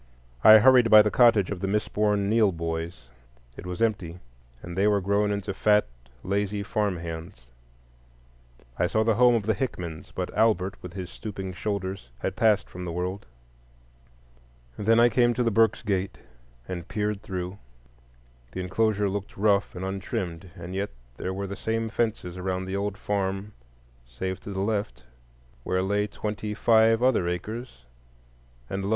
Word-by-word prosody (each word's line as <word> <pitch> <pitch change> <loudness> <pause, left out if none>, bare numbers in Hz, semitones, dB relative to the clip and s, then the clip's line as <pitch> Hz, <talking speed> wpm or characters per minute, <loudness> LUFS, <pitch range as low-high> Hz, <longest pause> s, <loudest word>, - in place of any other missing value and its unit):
I 110 0 +10
hurried 125 +1 +6
by 110 -1 +9
the 105 - 0
cottage 115 -6 +4
of 100 - -3
the 95 - -2
misborn 105 0 0
Neill 110 -1 +4
boys. 80 -4 -5 0.5
It - - -9
was 90 +4 -2
empty, 100 -7 -1 0.5
and 85 0 -7
they 100 +2 +3
were 105 -1 +3
grown 100 +2 +1
into 100 -1 -3
fat, 105 +2 +3 0.4
lazy 100 +1 -1
farm 105 -3 -1
hands. 85 -2 -7 1.4
I 90 - +3
saw 110 +4 +1
the 115 0 +3
home 120 +2 +5
of 115 - 0
the 110 - +2
Hickmans, 90 -8 -5
but - - -4
Albert, 100 -4 +2
with 90 -1 -9
his 95 -2 -6
stooping 95 -3 -6
shoulders, 95 - -4
had 95 +9 -3
passed 110 -4 +3
from 90 - -8
the 90 - -4
world. 90 +3 -4 1.5
Then 115 +2 +3
I 120 - +7
came 120 -1 +3
to 125 - +1
the 115 - +1
Burkes' 110 +1 +3
gate 95 -3 -1 0.5
and 85 -2 -6
peered 105 -1 -2
through; 95 0 -5 0.9
the - - -5
enclosure 105 +2 +1
looked 100 0 -5
rough 100 -1 +2
and 90 +1 -4
untrimmed, 95 -2 -4
and 90 -1 -8
yet 100 +2 -2 0.3
there 95 - -3
were 100 +1 -4
the 100 +1 -5
same 115 +2 -2
fences 110 -6 -2
around 95 0 -2
the 95 +1 -4
old 100 0 -2
farm 100 -1 -2 0.6
save 95 +11 -4
to - - -10
the 95 -1 -3
left, 100 - -2 0.6
where 95 0 0
lay 105 +2 0
twenty 105 0 -4
five 115 +1 +4
other 120 -9 +3
acres. 95 - -5 0.8
And 95 +6 -4
lo! 100 - -2
100 Hz, 165 wpm, -26 LUFS, 90-110 Hz, 1.5 s, I